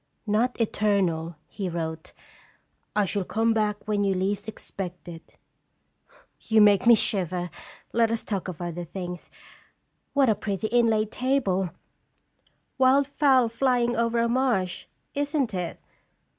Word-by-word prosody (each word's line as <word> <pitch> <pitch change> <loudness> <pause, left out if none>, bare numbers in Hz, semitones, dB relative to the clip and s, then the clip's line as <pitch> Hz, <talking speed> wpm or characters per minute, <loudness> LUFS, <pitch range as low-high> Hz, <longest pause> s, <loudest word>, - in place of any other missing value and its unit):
'Not 230 +4 0
eternal,' 190 -7 0
he 195 -3 -4
wrote; 160 -1 -5 0.8
M 210 -1 +3
shall 200 +1 -1
come 225 +4 +1
back 210 -1 -1
when 205 -1 +1
you 195 -1 +1
least 200 +3 -1
expect 185 -4 -7
it.'" 165 -1 -11 1.0
"You 220 -1 +2
make 210 +2 +5
me 235 - +9
shiver. 180 -4 -1 0.4
Let 230 -1 +3
us 230 0 -2
talk 195 -4 -3
of 180 -2 -6
other 175 0 -4
things. 180 +1 -7 0.8
What 280 -2 +4
a 220 - +5
pretty 205 0 -3
inlaid 220 -2 +2
table 245 -9 0 1.1
wild 265 +2 +5
fowl 270 -3 +3
flying 240 0 +1
over 235 0 +1
a 235 0 +2
marsh 235 -8 0 0.3
isn't 285 -4 -1
it? 180 -2 -4
210 Hz, 130 wpm, -26 LUFS, 185-235 Hz, 1.1 s, me